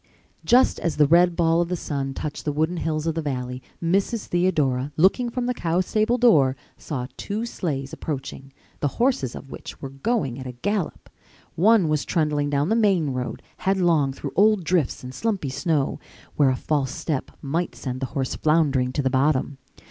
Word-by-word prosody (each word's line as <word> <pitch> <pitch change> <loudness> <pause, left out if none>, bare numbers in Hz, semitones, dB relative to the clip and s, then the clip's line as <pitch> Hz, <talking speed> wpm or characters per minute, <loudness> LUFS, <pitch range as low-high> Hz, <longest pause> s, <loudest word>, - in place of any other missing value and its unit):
Just 250 +2 +4
as 170 - -2
the 150 - +6
red 170 +3 +4
ball 165 0 +3
of 175 - -1
the 180 - 0
sun 135 -5 -3
touched 150 -1 -5
the 150 - -1
wooded 160 +4 0
hills 155 -1 -2
of 165 - 0
the 165 - -2
valley, 125 -3 -4 0.2
Mrs. 195 +6 +1
Theodora, 150 -7 +1
looking 195 +9 +3
from 245 +1 -2
the 250 - 0
cowstable 215 +6 +1
door, 150 - +5 0.2
saw 125 -5 -4
two 215 +3 -3
sleighs 140 - -4
approaching, 135 -2 -6 0.3
the 145 - +1
horses 235 - +1
of 135 - -10
which - - -9
were 135 - -7
going 135 - -1
at 130 - -6
a 125 - -6
gallop. 195 - -3 0.5
One 205 0 +4
was 155 -1 +1
trundling 150 -3 0
down 145 +3 +1
the 220 - +3
main 195 -10 +2
road, 125 -1 -4
headlong 175 -7 +2
through 135 - -6
old 210 -1 +4
drifts 165 -6 0
and 125 0 -7
slumpy 200 - -1
snow, 145 +1 0 0.4
where 145 -3 +4
a 130 - +1
false 140 0 -1
step 150 -5 -3
might 165 +5 -2
send 130 -2 -5
the 135 - -2
horse 130 -2 -1
floundering 145 -5 +2
to 145 - -1
the 130 - +1
bottom. 135 0 +1
155 Hz, 185 wpm, -24 LUFS, 135-185 Hz, 0.5 s, the